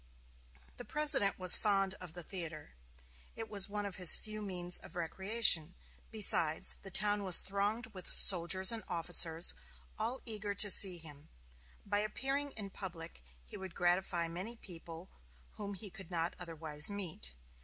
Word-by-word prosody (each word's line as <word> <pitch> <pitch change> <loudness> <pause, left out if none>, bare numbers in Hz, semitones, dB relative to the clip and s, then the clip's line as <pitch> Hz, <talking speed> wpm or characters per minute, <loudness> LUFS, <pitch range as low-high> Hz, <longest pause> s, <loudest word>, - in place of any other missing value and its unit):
The - - -10
President 300 -10 -2
was 185 -1 +6
fond 195 -2 -2
of 180 -3 -11
the 175 0 -9
theater. 165 - -9 0.6
It 225 - -9
was 200 -2 -5
one 205 0 -6
of 200 - -8
his 180 -3 +10
few 215 -1 -7
means 180 -3 -3
of - - -14
recreation. 180 -1 +2 0.3
Besides, 190 -6 +3
the 195 - -10
town 205 +2 +2
was 185 -3 +8
thronged 205 +4 -4
with 185 -2 -9
soldiers 185 +1 +5
and 230 -1 -4
officers, 165 -1 +2 0.5
all 255 +3 -4
eager 210 -3 -6
to 205 +1 +4
see 185 -3 +3
him; 150 -2 -12 0.6
by 205 0 -3
appearing 270 +7 -5
in 200 -3 -7
public 170 - -10 0.2
he - - -12
would 190 -2 -11
gratify 175 -1 -2
many 185 +8 -8
people 170 -4 -13 0.4
whom 200 -1 -9
he 200 0 -9
could 195 -4 -12
not 170 -1 -4
otherwise 160 -3 -1
meet. 175 - -7
190 Hz, 155 wpm, -32 LUFS, 170-205 Hz, 0.6 s, his